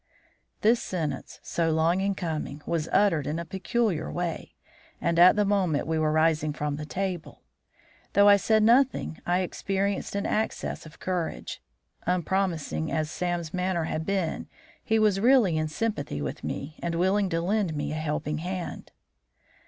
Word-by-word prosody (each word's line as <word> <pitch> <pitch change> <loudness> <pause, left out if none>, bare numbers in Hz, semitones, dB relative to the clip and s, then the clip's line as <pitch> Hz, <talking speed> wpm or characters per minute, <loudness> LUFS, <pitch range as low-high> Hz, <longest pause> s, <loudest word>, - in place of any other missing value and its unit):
This 230 +2 +4
sentence, 155 -7 -4
so 165 -1 0
long 165 +3 +2
in 195 0 0
coming, 155 -4 -4
was 165 -1 -1
uttered 165 -9 +3
in 150 +2 -1
a 170 - -4
peculiar 190 -1 -1
way, 175 -1 -4 0.4
and 170 0 +1
at 180 +1 +8
the 210 -1 +2
moment 190 -7 +1
we 160 0 0
were 155 -1 +2
rising 155 -1 +2
from 150 -1 -2
table. 175 +3 -4 0.7
Though 200 0 +6
I 205 0 +8
said 215 +2 +3
nothing, 240 - +3
I 180 +1 +2
experienced 195 +2 -2
an 200 - -1
access 215 -6 -2
of 155 - -16
courage. 180 - -3 0.5
Unpromising 175 - 0
as 155 -1 -1
Sam's 175 -2 -2
manner 180 -2 0
had 160 0 -2
been, 190 -3 -2 0.4
he 225 - +2
was 210 -3 +3
really 235 -6 +4
in 155 0 0
sympathy 155 - -2
with 70 -2 -5
me, 150 +3 -5
and 170 -1 -2
willing 190 +3 +2
to 165 -1 0
lend 185 -1 0
me 145 - -2
a - - -3
helping 150 -1 -2
hand. 180 +1 -5
175 Hz, 160 wpm, -27 LUFS, 155-195 Hz, 0.7 s, at